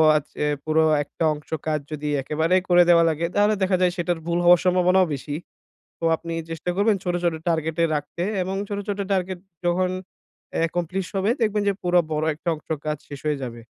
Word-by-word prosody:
আ - - +6 0.2
যে 150 - -1 0.2
পুরো 160 0 +3 0.2
একটা 145 - -5
অংশ 150 0 -11 0.2
কাজ 155 -1 +1
যদি 150 -1 -4
একেবারেই 160 +6 +1
করে 175 0 +7
দেয়া 170 -1 +7
লাগে। 160 +1 -1
তাহলে 205 +1 +4
দেখা 185 0 +2
যায় 180 -1 +4
সেটার 175 -1 -1
ভুল 170 0 +1
হওয়ার 175 0 +7
সম্ভাবনাও 180 +1 +4
বেশি। 145 +1 -4 0.6
তো - - -12
আপনি 165 0 -6 0.2
চেষ্টা 165 +2 -4
করবেন 205 +2 +3
ছোট, 180 -2 -1
ছোট 170 -2 +1
টার্গেট 160 -1 -1
এ - - +6
রাখতে 150 +4 -4 0.2
এবং 190 +2 -3
ছোট, 205 -1 -2
ছোট 205 0 -2
টার্গেট 185 -1 -1 0.3
যখন 180 +1 +2 0.8
একমপ্লিস 175 +2 -3
হবে 195 +2 +1
দেখবেন 215 -2 +2
যে - - +1
পুরো 180 0 +4
বড় 155 0 0
একটা 165 - -3
অংশ 155 - -16 0.2
কাজ 150 0 -1
শেষ 145 -1 -8
হয়ে 150 -1 +1
যাবে। 120 -2 -6
175 Hz, 195 wpm, -24 LUFS, 155-185 Hz, 0.8 s, করে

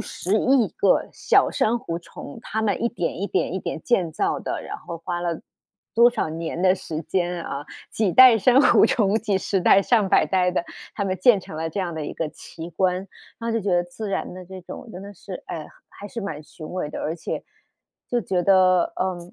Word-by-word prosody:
十 195 +5 -1
亿 255 0 +3
个 - - +2
小 - - +3
珊 230 +2 +1
瑚 170 -8 -4
虫， 145 -4 -11
它 220 0 -3
们 205 -2 0
一 235 - +1
点 175 -7 -3
一 200 - -1
点 185 - -1
一 190 - -2
点 160 - -5
建 180 -10 +1
造 - - 0
的， - - -4
然 - - -6
后 170 - -7
花 175 +1 -4
了 170 -2 -2 0.5
多 235 +3 +6
少 240 - -2
年 165 +2 -4
的 185 - +5
时 160 -3 -5
间 175 0 -1
啊， 145 +1 -5 0.2
几 205 -5 0
代 255 -3 +8
珊 250 +7 +5
瑚 - - +6
虫， 215 -6 +2
几 215 -3 0
十 190 0 -1
代、 195 +2 +5
上 215 -3 +2
百 - - +4
代 180 -1 +1
的， 175 - -1 0.3
它 200 - -2
们 185 -2 -2
建 205 0 +5
成 155 - -10
了 160 +1 -2
这 195 +5 -3
样 175 -2 -3
的 155 -2 -4
一 - - -6
个 160 - -2
奇 165 +2 -10
观。 180 +2 +1 0.5
然 230 - -2
后 - - -1
就 230 - 0
觉 200 -1 -2
得 175 - +3
自 175 +5 -7
然 195 - -3
的 185 - -9
这 190 0 -9
种 185 +7 -10
真 185 - -8
的 200 0 -9
是， 185 0 -9
哎， 155 -2 -6 0.2
还 205 - -11
是 230 - -6
蛮 180 -8 -5
雄 155 0 -10
伟 180 -5 -2
的。 - - -6
而 160 - -2
且， - - -5 0.7
就 245 - +1
觉 180 -5 -1
得， 185 -2 +4
呃， 185 -1 -1
185 Hz, 245 characters per minute, -23 LUFS, 170-215 Hz, 0.7 s, 代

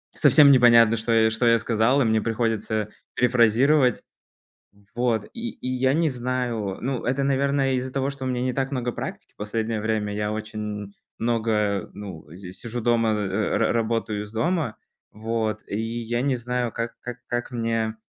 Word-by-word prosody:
совсем 145 -2 +6
непонятно, 115 -3 +6
что 115 +1 -2
я 110 -1 +4
что 110 +2 +1
я 115 0 +6
сказал, 115 +4 +2
и - - +3
мне 110 -1 +2
приходится 110 -1 -1 0.3
перефразировать. 125 +2 +3 0.9
Вот, 120 -3 0
и 235 0 -4
и 130 - -6
я 130 +1 +1
не 160 +1 +2
знаю 120 -6 -2
ну, 130 -1 -3
это, 135 +3 0
наверное, 140 0 +1
из-за 130 0 -3
того, 135 0 0
что 140 -1 -6
у - - -1
меня 125 -1 -1
не 125 0 -1
так 135 +1 -2
много 125 -3 -2
практики - - -7
последнее 110 +1 -2
время. 110 -1 -1
Я 105 0 -2
очень, 110 0 -6
м, 105 -1 -5 0.3
много, 110 -3 0
ну, 95 -7 -9
здесь 95 0 -10
сижу 120 +1 -5
дома, 115 -1 +2
э, 105 0 -1
ра - - +2
работаю 115 -2 -1
из 105 - -11
дома, 155 +1 -1 0.4
вот, 110 -1 -2
и 100 - -3
я 115 +1 -2
не 135 0 +1
знаю, 120 0 -2
как 115 +1 -4
как 125 0 -7
как 120 +2 -3
мне, 115 -2 -1
115 Hz, 175 wpm, -24 LUFS, 110-125 Hz, 0.9 s, совсем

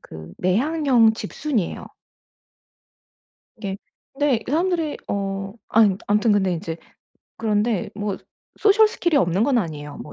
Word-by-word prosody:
그 80 +1 -11
내향형 245 - +3
집순이예요. 225 - -3 1.7
그게 195 -3 -5 0.4
근데 275 -4 +1
사람들이 330 +1 0
어 200 -1 -1 0.4
암 210 -4 +4
암튼 210 +1 +3
근데 190 -3 +2
이제 165 -1 -5 0.6
그런데 215 -2 0
뭐 205 -1 -3 0.4
소셜 430 +1 +5
스킬이 345 -6 0
없는 185 -5 +2
건 275 -3 +2
아니예요. 150 -6 -5
뭐 - - -9
215 Hz, 250 characters per minute, -22 LUFS, 190-285 Hz, 1.7 s, 소셜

